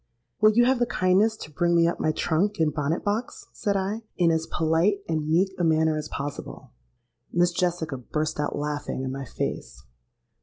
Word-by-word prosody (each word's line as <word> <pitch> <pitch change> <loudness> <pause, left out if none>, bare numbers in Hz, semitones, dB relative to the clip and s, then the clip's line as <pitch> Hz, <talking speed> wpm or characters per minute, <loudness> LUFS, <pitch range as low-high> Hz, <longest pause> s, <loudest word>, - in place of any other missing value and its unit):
'Will 215 - +7
you 240 +2 +5
have 260 0 +3
the 240 - +2
kindness 200 +4 +2
to 155 - -9
bring 170 +3 +1
me 170 0 +5
up 170 - -2
my 155 - +1
trunk 185 +7 0
and 155 -3 +1
bonnet 150 +2 -1
box?' 215 +4 -3
said 200 -1 -1
I, 200 +4 -2 0.2
in 170 -2 +4
as 160 0 0
polite 170 +5 +1
and 155 -2 -1
meek 185 +4 +2
a - - +1
manner 160 -1 +3
as 155 - -4
possible.—Miss 140 - -4
Jessica 170 -5 -1
burst 155 +5 -3
out 150 - -1
laughing 145 -2 -3
in 130 - -3
my 135 0 -5
face. 65 - -5
165 Hz, 185 wpm, -25 LUFS, 150-190 Hz, 0.2 s, Will